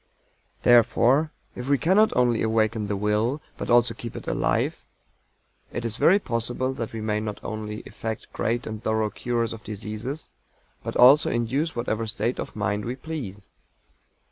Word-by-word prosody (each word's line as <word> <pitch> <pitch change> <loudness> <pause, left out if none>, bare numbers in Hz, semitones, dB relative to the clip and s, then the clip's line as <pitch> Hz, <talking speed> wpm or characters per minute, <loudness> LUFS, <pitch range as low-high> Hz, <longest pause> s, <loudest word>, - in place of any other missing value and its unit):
Therefore 120 +5 +5 0.2
if 125 +2 -6
we 140 - +4
cannot 195 +9 +4
only 120 -2 +3
awaken 110 -1 +1
the 100 - -1
Will, 105 +7 +1 0.2
but - - -6
also 120 -1 +4
keep 115 0 -8
it - - -7
alive, - - 0 0.8
it 120 - -4
is 115 0 -2
very 190 - +6
possible 120 - -2
that 115 -4 -4
we 115 - -5
may 105 0 0
not 105 -1 -4
only 105 0 -5
effect 110 -1 -6
great 120 +3 -1
and 110 -1 -5
thorough 110 -1 0
cures 120 -2 -1
of 110 - -10
diseases, 110 +7 -5 0.5
but - - -5
also 135 +4 +7
induce 135 +7 -1
whatever 115 -2 -2
state 115 +3 -1
of - - -5
mind 105 0 -1
we 120 +2 -3
please. 130 -10 -7
115 Hz, 160 wpm, -25 LUFS, 110-125 Hz, 0.8 s, also